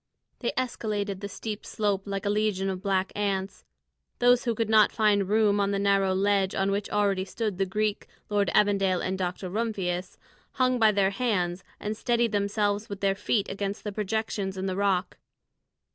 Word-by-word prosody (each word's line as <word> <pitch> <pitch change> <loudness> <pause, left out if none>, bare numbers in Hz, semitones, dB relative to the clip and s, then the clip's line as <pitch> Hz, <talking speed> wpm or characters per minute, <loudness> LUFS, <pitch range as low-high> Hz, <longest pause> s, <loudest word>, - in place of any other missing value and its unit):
They - - -1
escaladed 210 -6 -2
the 200 0 -6
steep 215 0 -6
slope 205 -2 -1
like 195 0 -3
a - - +1
legion 205 -2 0
of 185 -1 -5
black 190 -1 0
ants; 195 -1 -2 0.5
those 245 0 +4
who 235 -2 0
could 225 0 0
not 215 -1 +5
find 205 -3 +2
room 210 -1 +3
on 200 0 +2
the 200 - 0
narrow 195 -1 +2
ledge 195 0 +2
on 195 +1 +1
which 200 +1 -2
already 200 -2 +1
stood 200 0 -3
the 195 - +1
Greek, 210 +2 -1 0.2
Lord 205 -3 +1
Evandale, 195 -3 +3
and 190 - -1
Dr. 185 0 -3
Rumphius, 185 -3 -2 0.4
hung 255 -1 +2
by 220 -1 +6
their 195 -1 +2
hands 190 -5 -1 0.2
and 210 +1 -3
steadied 235 0 +1
themselves 205 0 0
with 200 -1 -6
their 195 -1 +3
feet 205 +1 0
against 200 0 -4
the 210 - -3
projections 205 -2 -2
in 190 - -3
the 190 -1 -1
rock. 195 -2 0
200 Hz, 180 wpm, -27 LUFS, 195-215 Hz, 0.5 s, by